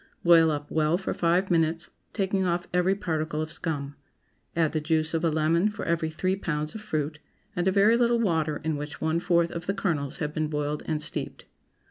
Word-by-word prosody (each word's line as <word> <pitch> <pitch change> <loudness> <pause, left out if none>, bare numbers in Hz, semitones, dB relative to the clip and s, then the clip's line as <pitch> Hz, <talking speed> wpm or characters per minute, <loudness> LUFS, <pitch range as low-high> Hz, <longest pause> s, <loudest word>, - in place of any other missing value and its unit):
Boil 165 -2 +6
up 145 -1 -3
well 155 +2 +2
for 190 - -3
five 175 +3 +1
minutes, 165 0 +1 0.2
taking 195 -2 0
off 175 -1 -1
every 180 +2 +3
particle 160 -5 -2
of 155 0 -3
scum. 145 -3 -3 0.6
Add 165 -2 +2
the 155 - -1
juice 160 +1 0
of 165 0 0
a 165 - +3
lemon 160 +5 +2
for 210 - -6
every 165 -1 0
three 185 +4 -1
pounds 155 -5 -3
of 220 - -7
fruit, 150 -7 -3 0.4
and 180 0 0
a - - +4
very 205 +4 +5
little 235 0 +3
water 160 -8 0
in 160 -2 -1
which 150 +1 -6
one 160 +1 0
fourth 170 -1 +2
of 170 +1 -6
the 195 - 0
kernels 155 -9 -1
have 150 -1 -3
been 155 -1 -1
boiled 150 0 -2
and 155 -2 -1
steeped. - - -4
165 Hz, 205 wpm, -27 LUFS, 155-180 Hz, 0.6 s, Boil